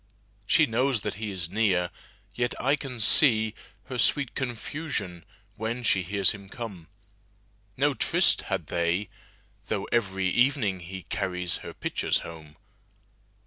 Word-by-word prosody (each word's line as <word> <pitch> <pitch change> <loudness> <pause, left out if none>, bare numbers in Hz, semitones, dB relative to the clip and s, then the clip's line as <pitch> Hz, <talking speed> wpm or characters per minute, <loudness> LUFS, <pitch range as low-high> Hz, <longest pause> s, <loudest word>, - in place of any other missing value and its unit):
She - - +5
knows 125 0 +1
that 105 - -3
he 110 - -2
is 90 -4 -4
near, 95 -5 +2 0.4
yet 120 0 -1
I 135 +3 +3
can 135 -4 -7
seeHer 110 -1 +4 0.5
sweet 140 0 +3
confusion 120 - -4 0.3
when 115 +3 -3
she 95 -4 +3
hears 95 +1 +2
him 100 -2 -10
come.No 100 - -6
tryst 120 - +4
had - - -1
they, 85 +3 0 0.6
though 100 -3 -1
every 95 -5 0
evening 120 -3 +2
heCarries 90 0 -2
her - - -9
pitchers - - 0
home. 80 -2 -10
105 Hz, 120 wpm, -27 LUFS, 95-120 Hz, 0.6 s, She